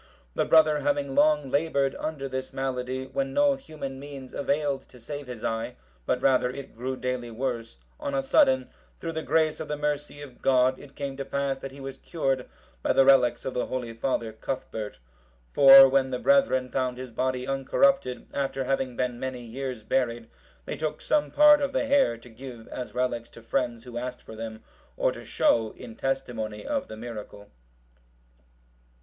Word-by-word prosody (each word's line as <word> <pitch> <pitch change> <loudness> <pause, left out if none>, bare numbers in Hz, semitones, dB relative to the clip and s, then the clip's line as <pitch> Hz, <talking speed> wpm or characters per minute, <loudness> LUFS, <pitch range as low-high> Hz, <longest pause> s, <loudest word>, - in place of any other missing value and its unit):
The - - +1
brother 155 -2 +5
having 145 -1 0
long 150 -1 +3
laboured 140 -2 +1
under 150 -3 -3
this 130 0 -4
malady, 130 0 -3
when 270 - -3
no 285 0 +5
human 150 - -7
means 140 -2 -9
availed 140 -1 0
to 125 - -15
save 145 +3 -7
his 125 -3 -8
eye, 115 0 -2 0.3
but 125 - 0
rather, 130 -2 +4
it 135 +1 -8
grew 130 +3 -3
daily 125 -2 -3
worse, 115 - -4 0.2
on 140 - -3
a 135 - +1
sudden, 130 -1 +3 0.3
through 165 - -4
the 160 0 -3
grace 155 +2 +1
of 160 - -5
the 150 0 -3
mercy 145 0 -2
of 130 -4 -13
God, 130 0 +3
it 140 -1 -14
came 140 -1 -4
to 140 - -3
pass 140 -1 -2
that 135 - -7
he 140 - -12
was 135 -1 -7
cured 135 -6 -2 0.3
by - - +2
the 135 - +5
relics 125 -3 +5
of 130 - -2
the 125 - -1
holy 125 -3 -4
father, 115 -1 -2
Cuthbert. 110 -2 -5 0.5
For 135 -1 +10
when 135 0 +2
the 125 - -2
brethren 270 - +3
found 130 -2 -1
his 130 -1 -7
body 130 +1 -1
uncorrupted, 135 - +2
after 135 -1 -1
having 130 -1 -1
been 125 -1 -1
many 130 -1 -4
years 125 0 -5
buried, 115 -1 -1 0.3
they - - -4
took 155 -1 -2
some 300 -1 +1
part 295 0 +7
of 280 - -1
the - - +1
hair, 275 - +3
to 120 +2 -15
give, 120 -1 -10
as 125 -3 -6
relics, 120 -2 -1
to 115 - -14
friends 120 -1 -1
who 120 -1 -6
asked 125 0 -6
for 110 - -10
them, 110 0 -7 0.3
or - - +2
to - - -9
show, 110 -2 +2
in 115 - -10
testimony 120 -6 -3
of 280 -2 -1
the 110 - -8
miracle. 110 -3 -8
130 Hz, 185 wpm, -27 LUFS, 125-140 Hz, 0.5 s, For